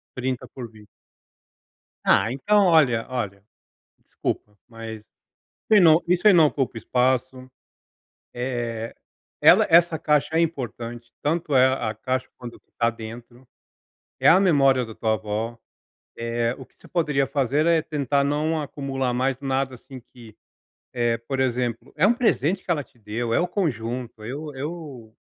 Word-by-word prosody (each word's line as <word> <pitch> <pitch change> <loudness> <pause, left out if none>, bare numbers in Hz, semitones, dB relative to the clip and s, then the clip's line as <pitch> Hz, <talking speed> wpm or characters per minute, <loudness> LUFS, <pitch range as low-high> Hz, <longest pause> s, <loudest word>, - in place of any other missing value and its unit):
30 130 -1 -3
por 120 -3 -9
20. 110 -2 -17 1.2
Ah 110 - +4
então 200 +11 +2
olha 140 -10 +3
olha, 105 -6 -4 0.6
desculpa, 105 0 -5
mas 115 -2 -9 0.6
isso 210 -3 +6
não 160 -1 +6
isso 180 +2 +1
aí - - +8
não 165 -4 +6
ocupa 135 -5 -2
espaço, 130 +2 -1 0.8
eh, 120 -2 -4 0.5
ela, - - +6
essa 170 0 +5
caixa 150 +1 +1
é 165 - +4
importante, 120 -6 -4
tanto 155 -1 -1
é 130 0 +6
a 130 -4 0
caixa 130 +4 -2
quanto 120 -1 -9
o - - -25
que - - -47
está 115 - 0
dentro, 120 +2 -11 0.7
é - - +3
a 180 - +7
memória 135 -9 +3
da 110 - -10
tua 110 0 0
avó. 110 +2 -4 0.6
Eh, 115 +1 -1
o 130 - -10
que - - -35
você - - -18
poderia 150 -6 0
fazer 140 +3 0
é 170 -1 +4
tentar 145 -3 0
não 155 +3 0
acumular 135 -3 -3
mais 130 +1 0
nada, 135 -1 -2
assim, 130 +2 -12
que, 120 -2 -16 0.6
eh, 120 -1 0
por 135 -1 -2
exemplo, 125 -2 -2
é 165 +6 +4
um 230 - +5
presente 195 - +1
que - - -8
ela 150 -5 0
te 125 - -30
deu, 115 +2 -4
é - - +3
o 175 - 0
conjunto, 120 - -3
eu 145 +6 -6
eu 140 -6 -8
130 Hz, 155 wpm, -24 LUFS, 115-150 Hz, 1.2 s, aí